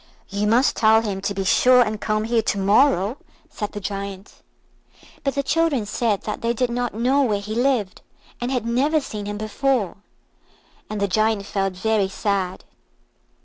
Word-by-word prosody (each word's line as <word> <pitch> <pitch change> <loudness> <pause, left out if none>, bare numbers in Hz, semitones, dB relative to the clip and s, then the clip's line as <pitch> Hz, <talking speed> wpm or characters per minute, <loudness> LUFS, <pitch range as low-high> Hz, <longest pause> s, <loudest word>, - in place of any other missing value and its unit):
"You 205 +1 -1
must 240 +5 +3
tell 220 0 +5
him 195 -3 -3
to 200 +1 -2
be 195 - -1
sure 250 +5 +5
and 215 -1 -4
come 215 0 0
here 230 +1 +1
to 210 - -1
morrow," 205 +2 +3 0.3
said 210 -2 -5
the 205 - -4
Giant. 200 0 -6 0.8
But 275 -1 -1
the 280 - 0
children 290 -5 +1
said 210 -1 -1
that 210 - -4
they 230 0 0
did 245 +1 -1
not 245 -2 -2
know 255 +5 +2
where 215 -7 +1
he 210 +2 -6
lived, 240 -5 0 0.4
and 245 +2 -2
had 250 -4 -1
never 275 +7 +2
seen 210 -7 -6
him 205 0 -4
before; 215 -1 -1 0.9
and 215 - -4
the 200 - +1
Giant 215 +1 +1
felt 195 -1 -1
very 210 +1 +1
sad. 195 -2 -2
215 Hz, 175 wpm, -22 LUFS, 200-245 Hz, 0.9 s, tell